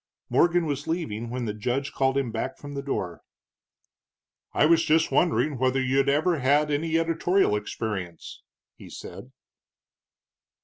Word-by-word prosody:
Morgan 175 0 +3
was 145 -1 -3
leaving 120 -10 -3
when 125 0 -3
the 105 - -2
judge 125 +7 -2
called 135 0 +1
him 135 -4 -1
back 115 +4 -4
from 145 0 -9
the 140 - -3
door. 95 -11 -4 1.3
"I - - +3
was 165 +1 +4
just 160 +1 +2
wondering 155 -5 +2
whether 130 +1 +2
you'd 135 +2 +2
ever 155 +3 +2
had 145 +3 +2
any 160 +3 0
editorial 165 - +2
experience?" 105 -5 -5 0.3
he - - -13
said. - - -10
140 Hz, 140 wpm, -26 LUFS, 125-160 Hz, 1.3 s, was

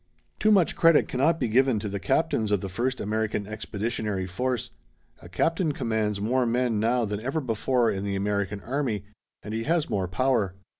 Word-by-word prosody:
Too 215 - +3
much 195 -6 +4
credit 165 -2 +5
cannot 155 +6 +1
be - - 0
given 130 +1 +3
to 105 0 -3
the 100 0 -3
captains 110 - +1
of 100 -3 +2
the 95 - -4
first 125 +7 -1
American 105 0 -1
Expeditionary 105 -1 -3
Force. 125 +7 -2 0.5
A 85 - -12
captain 165 - 0
commands 110 -5 -1
more 125 +4 +1
men 120 -2 +1
now 120 +2 +2
than 105 -1 -3
ever 135 +8 -2
before 120 -1 +1
in 95 0 -3
the 100 -1 -2
American 100 0 -1
army 125 -6 -2 0.4
and 105 - -6
he 115 +1 -2
has 165 0 +1
more 95 -2 0
power. 105 -1 +1
110 Hz, 185 wpm, -26 LUFS, 100-130 Hz, 0.5 s, credit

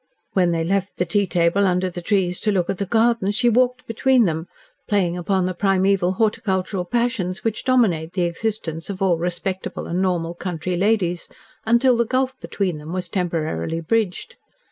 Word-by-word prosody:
When 180 -2 +3
they 165 -1 0
left 195 +3 -1
the 180 - +1
tea 200 +4 +1
table 175 +3 +2
under 180 0 +1
the 175 -1 -6
trees 180 -2 0
to 215 - +1
look 185 -2 +1
at 195 - -6
the 200 - -2
gardens, 225 -2 +2
she 240 +2 +3
walked 250 +1 +2
between 245 +1 +3
them, 160 -1 -2 0.4
playing 185 -4 +1
upon 185 +1 0
the 185 - -1
primeval 190 0 +2
horticultural 195 -3 0
passions 225 -4 -1
which 225 -2 -2
dominate 190 -11 +2
the 185 - 0
existence 170 -2 -3
of 195 -1 -3
all 175 -4 +2
respectable 185 +2 -3
and 175 +2 -1
normal 175 -3 0
country 175 0 -3
ladies, 180 -3 0 0.4
until 235 +2 +4
the 235 -1 +1
gulf 260 +2 0
between 185 -6 -2
them 150 +2 -8
was 180 -1 -3
temporarily 165 - -2
bridged. 220 - -1
185 Hz, 175 wpm, -22 LUFS, 175-220 Hz, 0.4 s, until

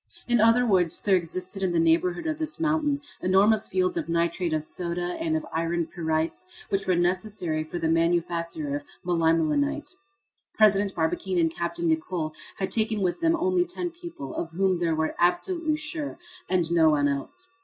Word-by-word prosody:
In 240 -1 +3
other 230 +2 +5
words, 185 -7 +2
there 200 -2 +3
existed 185 +2 -3
in 185 -2 +1
the 170 - +2
neighborhood 170 +2 +2
of 315 -1 -2
this 315 0 -3
mountain 300 -3 +1 0.2
enormous 205 +4 +3
fields 370 -1 0
of 335 - -3
nitrate 170 +1 0
of 155 -1 0
soda 175 +2 -3
and 320 -1 0
of 315 - -5
iron 165 +1 0
pyrites, 160 - -2 0.2
which 195 0 -1
were 185 - +3
necessary 175 -2 -1
for 155 +3 -6
the 165 -1 -1
manufacture 165 -2 0
of - - -7 0.2
melimelonite. 170 - +1 0.6
President 200 -2 +4
Barbicane 175 +3 -1
and 165 -1 +2
Capt. 170 0 -3
Nicholl 160 -1 -1 0.2
had 190 - -2
taken 220 -2 0
with 180 - -1
them 330 0 +3
only 360 +1 +2
ten 355 0 -4
people, 340 - -8
of 165 - -3
whom 185 0 +1
they 170 -1 +1
were 160 0 0
absolutely 315 - +1
sure, 305 -1 -4 0.3
and 175 -3 +1
no 165 -2 +5
one 145 -2 +3
else. 140 - -4
180 Hz, 175 wpm, -26 LUFS, 165-250 Hz, 0.6 s, other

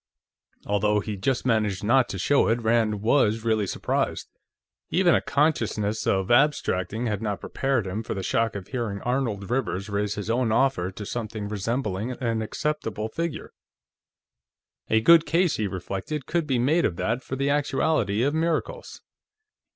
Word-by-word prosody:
Although 105 +1 +2
he 105 0 -4
just 120 +7 -1
managed 105 -5 +1
not 125 +4 +3
to 95 - -4
show 140 +10 +3
it, 115 +1 0
Rand 110 -2 +1
was 115 -2 +2
really 110 -3 +1
surprised. - - -2 0.6
Even 180 -2 +3
a - - +3
consciousness 115 -8 0
of 95 +2 +1
abstracting 120 -5 +2
had 105 -3 -2
not 105 -3 -2
prepared 135 -6 -1
him 95 +4 -3
for 115 - -5
the 95 - -4
shock 115 +2 0
of 100 -2 -7
hearing 115 -6 -3
Arnold 120 -6 -1
Rivers 105 -6 -1
raise 100 0 -1
his 105 -1 -5
own 115 0 +1
offer 110 -7 +2
to 100 +2 -8
something 110 -2 -4
resembling 105 +1 -2
an 115 -3 -2
acceptable 110 -3 -3
figure. 165 +4 -4 1.4
A 110 0 +3
good 165 +6 +6
case, 175 0 +2
he 105 - 0
reflected, 100 - -5
could 165 0 -1
be 130 -3 +1
made 150 +8 +2
of 85 - 0
that 115 +7 -1
for 130 - -5
the 140 +1 0
actuality 140 -7 +1
of 140 +2 +1
miracles. 165 - -2
115 Hz, 160 wpm, -25 LUFS, 105-135 Hz, 1.4 s, good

